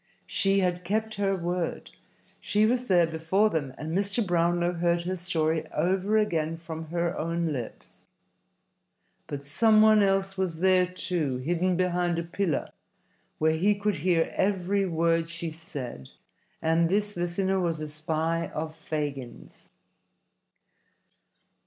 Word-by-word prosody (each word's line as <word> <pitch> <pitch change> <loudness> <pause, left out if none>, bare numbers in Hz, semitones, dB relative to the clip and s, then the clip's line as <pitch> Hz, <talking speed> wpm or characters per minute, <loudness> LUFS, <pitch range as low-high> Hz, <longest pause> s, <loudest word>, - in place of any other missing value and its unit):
She 195 0 +2
had 180 -1 0
kept 220 +4 -1
her 195 -1 +2
word. 175 -1 -3 0.5
She 210 +1 +2
was 250 +2 +1
there 175 -3 +5
before 165 +6 +1
them, 145 -5 -2
and 160 +2 -4
Mr. 200 +3 0
Brownlow 175 0 +1
heard 170 0 +1
her 185 +2 -2
story 160 -3 -1
over 190 +6 +1
again 165 -6 0
from 165 -1 -7
her 170 +1 -1
own 165 0 -1
lips. 125 -4 -8 1.2
But 140 -1 -5
some 215 +10 +4
one 215 -1 +6
else 195 -1 +1
was 185 -3 0
there, 185 -1 +4
too, 175 -7 -2
hidden 175 +6 0
behind 175 -1 +1
a 170 - -1
pillar, 170 -1 -2 0.7
where 160 +1 +3
he 195 +6 +2
could 205 -2 -1
hear 165 +1 +1
every 195 0 +1
word 165 -1 +1
she 170 -1 -4
said, 140 - -7 0.5
and 165 +1 +3
this 205 +2 0
listener 185 +2 0
was 170 -3 -1
a 155 - -4
spy 160 +2 -1
of 155 +1 -3
Fagin's. 145 -6 -6
175 Hz, 135 wpm, -27 LUFS, 160-190 Hz, 1.2 s, one